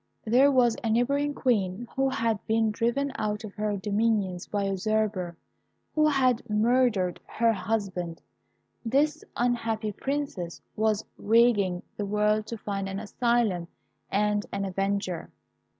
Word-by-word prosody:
There 255 +5 +5
was 245 -4 +4
a 225 - 0
neighbouring 280 +6 +1
Queen 220 -3 0
who 270 0 +2
had 225 -4 -1
been 220 0 +2
driven 240 +6 0
out 210 0 -2
of 210 -2 -8
her 210 -1 -1
dominions 205 -3 0
by 205 -1 -1
a 195 - 0
usurper, 195 -3 -1 0.6
who 305 0 +4
had 260 -5 +3
murdered 215 -4 +2
her 230 0 +2
husband. 185 -5 -2 0.6
This 290 +6 +1
unhappy 230 -3 0
Princess 265 -8 -3 0.2
was 215 -1 +1
ranging 205 -5 +3
the 205 - -2
world 210 +1 +1
to 230 - -5
find 195 -2 -3
an 195 0 -4
asylum 220 -6 0 0.4
and 210 +1 +1
an 200 0 -2
avenger. 195 -1 -2
215 Hz, 135 wpm, -27 LUFS, 200-240 Hz, 0.6 s, There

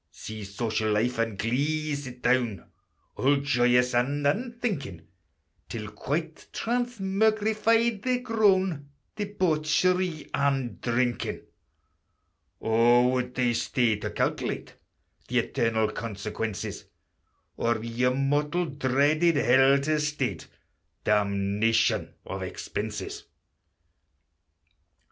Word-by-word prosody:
See 110 -1 -8
Social 110 +1 -1
life 115 +3 0
and 115 -3 -1
Glee 145 +8 0
sit 130 -3 -7
down, 120 -7 +1 0.5
All 140 +2 +3
joyous 125 -3 +2
and 140 +4 +1
unthinking, 190 - -2 0.7
Till, 110 -2 -5
quite 160 +3 -4
transmugrified, 220 -1 +1
they're 255 +2 +1
grown 190 - +2 0.3
Debauchery 180 -3 0
and 135 -3 0
Drinking: 120 0 -1 1.2
O, 120 +2 +4
would 125 -1 -1
they 125 -2 +2
stay 120 -1 +1
to 105 - -4
calculate - - -2 0.5
The 125 - -1
eternal 115 -3 +1
consequences; 110 -1 -5 0.7
Or 115 -1 +1
your 125 +2 0
mortal 145 +5 +1
dreaded 145 +4 +2
hell 135 +1 +5
to 155 +2 +1
state, 150 0 -2 0.6
Damnation 105 +2 +1
of - - -5
expenses! - - -5
135 Hz, 90 wpm, -27 LUFS, 115-165 Hz, 1.2 s, hell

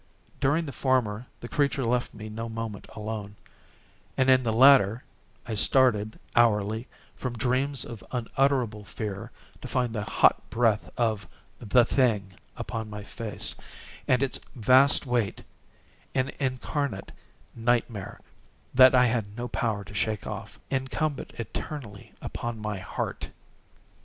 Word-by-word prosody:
During 155 +5 +2
the 140 - -5
former 125 -3 0
the 120 - -6
creature 140 -1 +1
left 120 +1 0
me 110 0 -7
no 115 +2 -5
moment 110 -2 -5
alone, 105 -1 -5 0.8
and 130 0 +4
in 130 0 +6
the 115 -3 0
latter 125 -2 +6 0.4
I 115 - -3
started 110 -1 +3 0.2
hourly 110 0 +3 0.3
from 125 -2 -4
dreams 130 +3 +1
of 115 -3 -9
unutterable 125 -3 0
fear 100 -1 -5 0.3
to - - -6
find 125 -3 0
the 110 - -2
hot - - +3
breath 115 -2 +1
of 110 -4 0 0.3
the 120 +2 +4
thing 110 -8 +1 0.2
upon 110 -1 -4
my 105 0 -7
face, 110 0 -3 0.5
and 125 +1 +3
its 135 - -1 0.2
vast 130 +5 +5
weight—an 125 +3 -4
incarnate 130 -4 -2 0.4
nightmare 115 -3 -1 0.5
that 130 0 +8
I 125 0 +6
had 110 -3 -1
no 120 +1 -3
power 110 -3 -1
to 100 - -12
shake 105 +1 -1
off—incumbent 135 +2 -3
eternally 115 -1 -6
upon 120 -1 -4
my 105 -2 -4
_heart! 95 - -4
115 Hz, 125 wpm, -27 LUFS, 105-130 Hz, 0.8 s, that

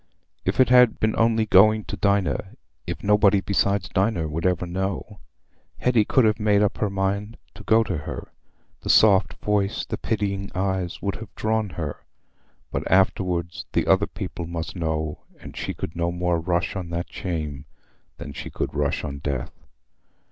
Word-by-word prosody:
If - - -1
it 130 - +6
had 125 -2 +6
been 110 0 +1
only 115 -1 +3
going 110 +2 +5
to - - -5
Dinah—if 100 -3 -2
nobody 105 -1 +4
besides 100 -1 0
Dinah 95 -5 0
would 80 +4 -1
ever 90 -1 0
know—Hetty 100 +5 -3
could 130 +1 +3
have 110 +1 +2
made 105 -1 +3
up 105 - 0
her 105 - +1
mind 100 +3 -2 0.2
to - - -12
go 115 0 +4
to 90 -7 -3
her. 75 - -7 0.5
The - - -6
soft 100 -2 +5
voice, 105 -1 0
the - - -5
pitying 100 -3 -2
eyes, 95 -2 -2
would 100 -1 -1
have 110 -3 -11
drawn 110 -1 0
her. 80 -4 -5 0.7
But - - -3
afterwards 90 -2 +1
the - - +2
other - - +3
people 85 +1 -6
must 85 +1 -5
know, 80 -3 -2 0.2
and - - -11
she - - -4
could 80 - -6
no 85 0 0
more 90 -1 0
rush 85 +3 -1
on 90 -3 -4
that 85 +1 -4
shame 75 -6 -4 0.5
than 70 - -8
she - - -7
could - - -3
rush 70 -1 -1
on 70 -2 -5
death. 70 -3 -3
95 Hz, 165 wpm, -24 LUFS, 85-105 Hz, 0.7 s, it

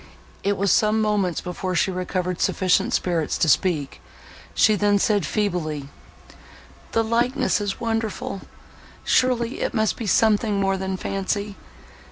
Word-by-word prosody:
It 200 0 0
was 200 0 +1
some 215 0 +3
moments 205 -5 0
before 180 +1 -4
she 190 - +2
recovered 180 0 -3
sufficient 185 -2 +2
spirits 170 -4 0
to 165 - +1
speak; 155 -3 +1 0.5
she 215 - +5
then 205 0 +2
said 205 0 +1
feebly—"The 150 - -5
likeness 240 +2 +1
is 205 -1 -3
wonderful!—surely 230 +2 -2
it - - -2
must 220 -1 +1
be 225 - -5
something 210 -1 +2
more 195 0 +1
than 190 0 -3
fancy. 200 +2 -3
200 Hz, 125 wpm, -23 LUFS, 180-220 Hz, 0.5 s, she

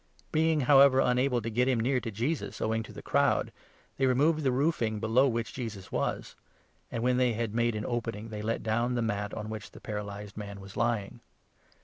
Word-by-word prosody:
Being, 160 -1 +2
however, 135 0 +6
unable 125 +1 +2
4 - - 0
to 115 - -2
get 125 +3 +2
him 130 -3 +2
near 125 +3 +1
to 115 -1 -5
Jesus, 120 +10 -3
owing 110 +1 0
to 110 - -9
the - - -10
crowd, - - +2 0.5
they 135 - +2
removed 150 +5 +3
the 135 -3 +2
roofing 125 -6 0
below 115 +5 +3
which 115 -2 -2
Jesus 110 -7 -6
was; - - -2 0.6
and, 115 - -3
when 125 0 +2
they 125 -2 +3
had 110 -1 -2
made 120 0 +1
an 105 0 -3
opening, 115 -2 -3
they 105 -1 -5
let 115 +2 -2
down' 120 +3 0
the 120 - 0
mat 105 -2 -2
on 105 -1 -5
which 110 -1 -6
the - - -13
paralyzed 105 -1 -6
man 100 -1 -7
was 95 0 -11
lying. 120 -2 -1
115 Hz, 210 wpm, -29 LUFS, 105-125 Hz, 0.6 s, however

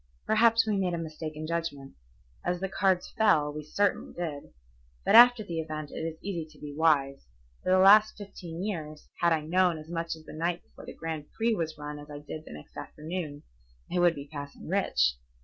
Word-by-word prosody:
Perhaps 225 +1 +4
we 215 -2 0
made 180 -3 0
a - - -3
mistake 155 -1 -6
in 155 +1 -5
judgment. 165 -5 -3 0.5
As 180 - -1
the 195 - -2
cards 190 -1 +1
fell, 150 -9 +4
we 150 - -5
certainly 200 +6 0
did. 160 -5 -5 0.5
But - - +3
after 240 -1 +9
the 170 -5 -4
event 155 -2 -5
it - - -6
is 160 0 -4
easy 185 -4 -3
to 155 - -19
be 145 -1 -7
wise. 140 - +2 0.3
For - - -3
the 185 - +5
last 210 +3 +7
fifteen 185 -4 -7
years, 155 -7 -5
had 170 0 +3
I 160 -1 +2
known 175 +2 +2
as 155 +1 -11
much 165 -1 -2
the 160 -1 -11
night 170 +2 -2
before - - -15
the - - -8
Grand 160 -2 -5
Prix 230 +1 +1
was 160 -6 -3
run 150 0 -6
as 145 +1 -12
I 145 - -7
did 150 +2 -8
the - - -11
next 75 0 -12
afternoon, 155 -2 -6 0.5
I - - +2
would 175 -1 +4
be 140 -1 -7
passing 145 -1 -8
rich. 65 - +2
165 Hz, 205 wpm, -29 LUFS, 150-185 Hz, 0.5 s, after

